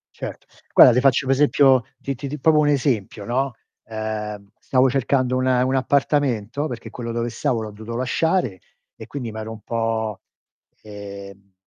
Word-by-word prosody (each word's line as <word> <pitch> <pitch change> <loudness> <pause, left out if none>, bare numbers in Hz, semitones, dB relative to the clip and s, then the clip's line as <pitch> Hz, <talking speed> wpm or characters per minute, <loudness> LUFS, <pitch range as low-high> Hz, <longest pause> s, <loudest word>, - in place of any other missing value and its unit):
Certo. - - -7 0.3
Guarda, 125 - +9
ti 125 - +3
faccio 135 +1 +3
un - - +2
esempio 135 -2 +4 0.2
ti 140 -1 -4
ti 140 - -6
ti 150 +2 -5
proprio 155 +2 +4
un 150 - +3
esempio, 125 -8 0
no. 130 +2 -1 0.3
Ehm, 105 -2 -5
stavo 130 0 +2
cercando 130 -1 +1
un 130 - 0
un 130 +1 +2
appartamento 135 -1 0
perché 120 -4 -7
quello 115 +1 -6
dove 120 +1 -2
stavo 115 0 -1
l'ho 110 - -6
dovuto 110 +3 -8
lasciare 130 - 0 0.4
e - - -11
quindi 125 -5 -5
mi 110 - -7
ero 110 0 -6
un 110 -1 -9
po', 115 -2 -2 0.6
ehm, 100 -2 -10
120 Hz, 170 wpm, -22 LUFS, 110-135 Hz, 0.6 s, Guarda